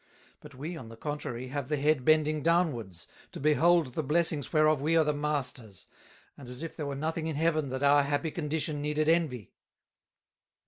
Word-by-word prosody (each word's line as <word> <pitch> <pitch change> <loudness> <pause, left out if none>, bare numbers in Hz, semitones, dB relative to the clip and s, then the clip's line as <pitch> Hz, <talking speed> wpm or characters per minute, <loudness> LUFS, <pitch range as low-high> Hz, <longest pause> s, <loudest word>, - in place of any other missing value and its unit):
But - - -14
we, 155 +7 -6
on 125 -8 -9
the 115 - -12
contrary, 130 -3 -5
have 140 -1 -4
the 150 - 0
Head 145 -1 +1
bending 155 +1 +3
downwards, 135 - 0 0.3
to - - -7
behold 155 -1 +3
the 160 - -1
Blessings 155 -1 0
whereof 155 -2 +3
we 160 +3 +2
are 160 - +5
the 150 0 0
Masters, 135 -8 -3 0.5
and 130 -4 -11
as 125 +5 -5
if 165 - -6
there 150 - -4
were 140 - -4
nothing 160 +3 -2
in 160 - -3
Heaven 155 -2 +1
that 130 +2 -4
our 145 +1 +5
happy 145 +3 -1
condition 150 -2 -2
needed 150 +1 0
Envy." 155 - +1
150 Hz, 185 wpm, -29 LUFS, 135-155 Hz, 0.5 s, are